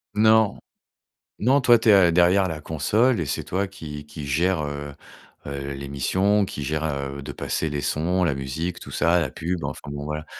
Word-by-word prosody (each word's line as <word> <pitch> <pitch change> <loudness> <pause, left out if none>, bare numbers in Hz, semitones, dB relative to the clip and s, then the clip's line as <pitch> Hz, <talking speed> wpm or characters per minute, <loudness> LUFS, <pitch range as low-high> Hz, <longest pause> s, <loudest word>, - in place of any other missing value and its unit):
Non, 110 0 +4 0.8
non, 130 +6 +3
toi, 120 -2 +6
tu 110 - +2
es, - - +8 0.2
heu, - - +2
derrière 90 +3 +4
la 80 -3 -5
console 105 - +1
et 85 - -1
c'est - - -3
toi 95 +2 -1
qui 75 -6 -9
qui 75 -1 -8
gère, 85 +4 +1
heu 75 -1 -5 0.5
heu, 70 0 -4
l'émission, 95 +10 0
qui 75 - -6
gère, 75 +2 -2
heu, 70 -2 -3
de - - -6
passer 80 - -2
les 75 -1 -2
sons, 90 +4 0
la 80 -5 +2
musique, 70 +6 -4
tout - - -10
ça, 85 +1 +2
la 75 -6 -2
pub. 85 +3 -3
Enfin - - -6
bon 70 0 -5
voilà, 75 +1 -4
80 Hz, 195 wpm, -24 LUFS, 70-95 Hz, 0.8 s, es